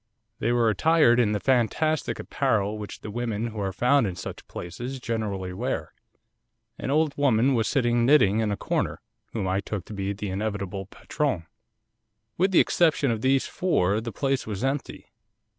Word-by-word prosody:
They 115 - +1
were 120 -1 +3
attired 120 - +4
in 110 -4 +3
the 105 - 0
fantastic 135 +6 +1
apparel 110 -6 0
which 105 - -8
the 105 - -7
women 115 0 -2
who 110 -1 -7
are 100 -1 -1
found 125 +4 +3
in 90 - -4
such 85 - -8
places 120 +10 -6
generally 105 -6 -3
wear. 90 - -3 0.9
An - - -4
old 150 0 +2
woman 135 -2 +3
was 115 -3 +1
sitting 120 -4 +2
knitting 120 -6 +5
in 110 -2 0
a 100 - -2
corner, - - -1 0.3
whom 105 -5 -2
I 95 +1 +1
took 100 -2 -5
to - - -9
be 100 0 -2
the 100 -1 -5
inevitable 100 -1 -3
patronne. 130 - -2 0.9
With 190 +3 +2
the 185 - +5
exception 155 -6 +3
of 110 -2 -2
these 135 +1 +2
four 105 - +1
the 115 +1 -5
place 135 -1 -1
was 105 +1 -4
empty. 135 +1 -3
115 Hz, 175 wpm, -26 LUFS, 100-135 Hz, 0.9 s, knitting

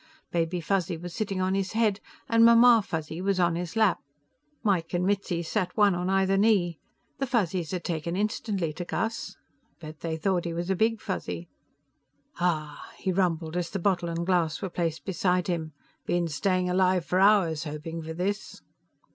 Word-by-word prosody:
Baby 170 +1 0
Fuzzy 175 0 0
was 175 +1 -8
sitting 195 -2 -2
on 185 +1 +1
his 195 +1 -1
head, 215 -3 +2 0.3
and 230 0 +4
Mamma 235 0 +7
Fuzzy 160 -1 -4
was 195 0 0
on 170 -2 +3
his 175 +3 -4
lap. 215 -5 +3 0.6
Mike 185 -5 +1
and 175 +1 +1
Mitzi 195 -3 0
sat 185 +4 -2
one 205 -2 +5
on 180 +1 -2
either 195 0 +2
knee. 195 -6 +2 0.4
The 270 - -1
Fuzzies 185 -9 0
had 180 -2 -3
taken 170 0 -3
instantly 200 -5 -1
to 175 - -5
Gus. 225 +5 -3 0.4
Bet 155 -2 -10
they 160 -1 -3
thought 180 0 0
he 170 - -2
was 175 +2 -2
a - - +2
Big 225 +3 +1
Fuzzy. 180 -4 -5 0.9
"Aaaah!" 155 -4 -1 0.2
he 190 - -1
rumbled, 170 -3 0
as 175 -1 -1
the 195 - -3
bottle 180 -2 0
and 170 0 -2
glass 170 -4 +1
were 190 - -4
placed 165 -4 -2
beside 180 -1 +1
him. 165 -3 -2 0.4
"Been 175 -1 +1
staying 185 +4 0
alive 180 -1 +2
for 180 - +1
hours 190 -6 +4
hoping 155 +2 -5
for 160 0 -6
this." 200 +4 -3
180 Hz, 180 wpm, -27 LUFS, 165-195 Hz, 0.9 s, Mamma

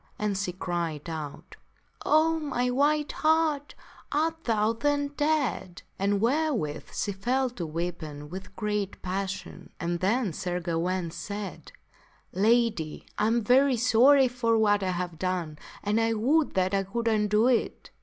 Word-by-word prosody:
And 210 -1 -1
she 190 -1 -2
cried 170 -4 -3
out, 150 -3 -7 0.2
" - - -41
Oh, 320 +1 +4
my 250 -5 -1
white 295 +3 +2
hart, 310 -2 +1 0.4
art 320 +2 -1
thou 220 -1 +2
then 285 +4 0
dead? 290 - -1
" - - -39
And 200 +1 +1
therewith 240 - 0
she 205 - -2
fell 250 +6 0
to 175 -9 -5
weeping 155 -3 -5
with 185 +4 -9
great 210 -2 -2
passion. 190 +1 -4
Then 185 +5 0
Sir 180 0 -3
Gawaine 170 0 -1
said, 200 0 -6 0.3
" - - -34
Lady, 210 -5 +1
I 210 - +3
am 230 +1 +1
very 255 +3 +4
sorry 255 +4 +5
for 235 -2 +1
what 205 -2 +3
I 190 - -1
have 175 -2 -3
done, 175 -5 -2 0.2
and 210 +2 +1
I 225 0 +2
would 280 +7 +2
that 185 0 +1
I 195 - +3
could 230 +5 -3
undo 210 0 +3
it." 250 -2 0
210 Hz, 155 wpm, -27 LUFS, 185-255 Hz, 0.4 s, sorry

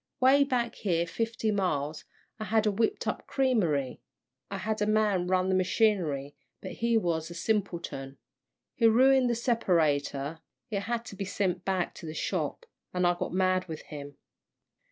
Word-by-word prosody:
'Way 270 +2 +6
back 245 -4 0
here 170 -4 0
fifty 225 +4 -2
miles, 155 -7 -1 0.3
I 215 - -3
had 220 0 +2
whipped 220 - 0
up - - -1
a - - -20
creamery; 175 - 0 0.5
I 195 - -4
had 215 +2 -2
a 210 - +2
man 215 -3 +3
to 175 - -2
run 185 0 +2
the - - +2
machinery, 180 - +1 0.2
but - - -7
he 235 0 +1
was 165 -5 -1
a 170 - -8
simpleton. 170 -9 -2 0.6
He 230 - +4
ruined 260 +2 +5
the 235 - +1
separator, 160 - +1 0.3
it 200 - 0
had 235 +3 -3
to 200 - -9
be 195 - -4
sent 185 -2 -1
back 185 -2 0
to 165 - -9
the 155 - -6
shop, 480 - -2 0.3
an' 180 0 +2
I 175 - +4
got 175 - -4
mad 185 0 +1
with 160 -2 -6
him. 145 -1 -9
190 Hz, 175 wpm, -29 LUFS, 165-225 Hz, 0.6 s, Way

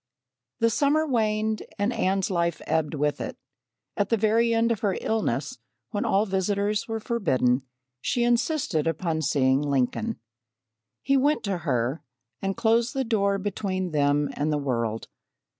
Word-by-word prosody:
The 230 0 +4
summer 295 +5 +2
waned 220 -3 0 0.2
and 205 +4 0
Anne's 195 -2 0
life 170 -2 0
ebbed 155 -1 0
with 145 0 0
it. - - -5 0.6
At 205 -2 0
the 230 - +3
very 225 +2 +3
end 230 0 +2
of 225 - 0
her 205 -4 0
illness, 145 - -1 0.3
when 205 - -1
all 200 +2 +3
visitors 200 +2 0
were 225 -1 -2
forbidden, 135 - +1 0.4
she 240 - 0
insisted 240 - +1
upon 165 0 -1
seeing 135 -2 +2
Lincoln. 145 - -1 0.8
He 275 0 +3
went 290 +3 +2
to 195 -4 -1
her 130 -2 -1 0.4
and 195 0 -2
closed 230 +1 +2
the 270 - +1
door 200 -4 +1
between 190 -2 -2
them 145 -1 +2
and 150 +2 -1
the 150 - +1
world. 115 -6 -2
195 Hz, 150 wpm, -26 LUFS, 150-225 Hz, 0.8 s, The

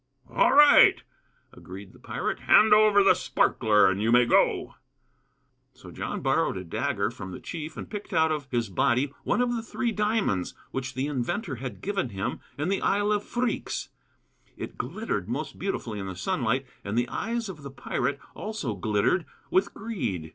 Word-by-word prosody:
"All - - +4
right," 295 0 +8 0.5
agreed - - -11
the - - -18
pirate; - - -3
"hand 215 0 +6
over 210 -1 +6
the 195 - +6
sparkler 105 -4 +3
and 95 +1 0
you 110 +2 +2
may 120 0 +6
go." 120 - +2 1.0
So - - -13
John - - -4
borrowed - - +1
a 95 - -5
dagger 85 - -1
from 95 - -8
the 90 - -7
chief 160 -2 -7
and - - -6
picked 205 -1 -7
out 160 -3 +3
of 150 -3 -3
his 120 -3 -1
body 125 +8 +1
one - - +1
of 240 -1 0
the 230 - -2
three 235 +1 -2
diamonds 210 - 0 0.2
which 130 -1 -4
the 130 +1 -1
inventor 140 - -3
had 130 +1 -7
given 195 -8 -2
him 95 -2 -4 0.2
in 150 +5 -1
the 195 - 0
Isle 205 +1 +1
of 205 -1 +1
Phreex. 240 -1 -2 0.7
It - - -7
glittered 130 - -3
most 145 +6 -4
beautifully 120 - -3
in 95 - -5
the 95 - -6
sunlight, 120 +7 -1 0.2
and 100 +3 -3
the 120 0 +1
eyes 230 +1 -3
of 175 -6 -8
the 140 - -8
pirate 135 0 -2
also 210 - -4
glittered 105 - 0 0.2
with 190 - +2
greed. 130 - -4
145 Hz, 175 wpm, -27 LUFS, -, 1.0 s, right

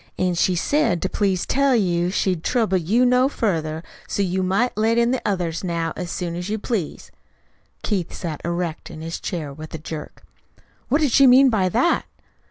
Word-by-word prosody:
"An' 185 -1 +1
she 180 +1 +2
said 285 - +1
to 190 - 0
please 195 -4 0
tell 275 -1 +2
you 175 -5 +1
she'd 185 -3 -1
trouble 220 -7 +1
you 215 +10 +2
no 250 +2 +4
further, 160 - -2 0.2
so 200 - -1
you 185 0 -1
might 195 +7 +1
let 225 +2 +2
in 235 +1 +3
the 260 - -1
others 175 -4 -2
now 170 -2 -2
as 180 -1 -5
soon 170 0 -3
as 175 +3 -5
you 215 - -1
please." 210 - -4 0.7
Keith 190 -6 -1
sat 160 -4 -5
erect 170 -1 -3
in 160 -2 -9
his 165 +1 -5
chair 155 -7 -4
with 155 +2 -9
a - - -3
jerk. 155 0 -8 0.7
"What 290 +6 +2
did 290 -4 +2
she 275 +3 +6
mean 260 +1 +7
by 190 -4 +2
that?" 245 - +2
185 Hz, 190 wpm, -22 LUFS, 170-235 Hz, 0.7 s, mean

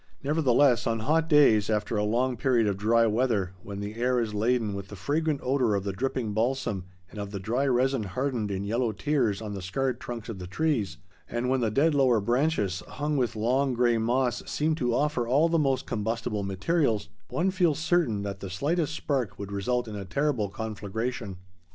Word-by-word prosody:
Nevertheless, 140 -4 +3
on 115 -1 0
hot 160 +6 +1
days 115 -9 +5
after 105 +1 0
a 105 - +1
long 125 +4 +1
period 120 -2 +2
of 100 -2 +1
dry 115 +4 +3
weather, 110 -5 +1
when 100 +1 -7
the 100 +1 -5
air 125 +2 +1
is 110 -3 -2
laden 110 0 +1
with 100 -1 -6
the 100 - -9
fragrant 145 - -1
odor 125 -5 +2
of 100 - -1
the 100 -1 -3
dripping 120 0 -2
balsam 110 -4 -1 0.3
and 105 - -8
of 100 -1 -4
the 100 -1 -5
dry 120 +8 0
resin 130 0 +2
hardened 115 +2 -2
in 100 0 -2
yellow 115 +2 0
tears 115 -6 0
on 105 -1 -5
the 100 - -5
scarred 125 +7 -1
trunks 120 -3 -6
of 110 -5 -6
the 90 - -6
trees, 105 - -1 0.3
and 120 +1 -1
when 130 0 +2
the 115 - +2
dead 145 +8 +3
lower 130 -5 +4
branches 120 - 0
hung 150 0 -2
with 125 -4 0
long 125 +4 +1
gray 120 -1 +3
moss 120 +2 +1
seem 155 +2 0
to 125 -6 0
offer 145 -4 0
all 145 +7 +3
the 165 0 +2
most 135 -3 +1
combustible 110 -1 -2
materials, 105 - 0 0.2
one 185 +3 0
feels 175 -6 +2
certain 160 - +1
that 100 -1 -5
the 95 - -6
slightest 155 - -1
spark 130 -10 -2
would 100 0 -6
result 120 +5 -1
in 110 - -6
a 100 - -5
terrible 120 +1 0
conflagration. 110 +1 -4
120 Hz, 200 wpm, -27 LUFS, 105-135 Hz, 0.3 s, days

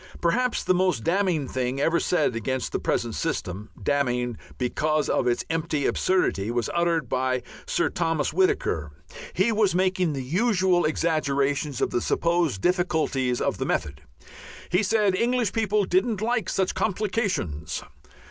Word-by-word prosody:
Perhaps 245 +9 +1
the - - +3
most 180 -10 +1
damning 175 -5 +1
thing 130 +1 -2
ever 165 +4 +2
said 175 -9 +1
against 130 +3 -2
the - - -1
present - - -1
system, 100 +5 -3
damning 125 -4 0 0.2
because 150 +4 0
of - - +1
its 120 - 0
empty 155 -3 -1
absurdity, 145 - +1
was 120 0 -1
uttered 170 -4 +1
by 130 +1 0 0.2
Sir - - +1
Thomas 165 -3 -1
Whittaker. 380 +2 +1 0.4
He 205 +5 +2
was 210 -4 +2
making 185 -3 +1
the 135 -2 -4
usual 185 - +2
exaggerations 145 -3 0
of - - +1
the 120 - 0
supposed 170 - +1
difficulties 160 -8 +1
of - - -1
the - - -1
method. 70 -2 -2 0.7
He 180 +3 +3
said 210 -1 +2
English 235 +1 +1
people 215 -2 +1
didn't 190 +4 +1
like 220 -2 0
such 190 -1 0
"complications." 190 - -2
170 Hz, 145 wpm, -25 LUFS, 130-190 Hz, 0.7 s, the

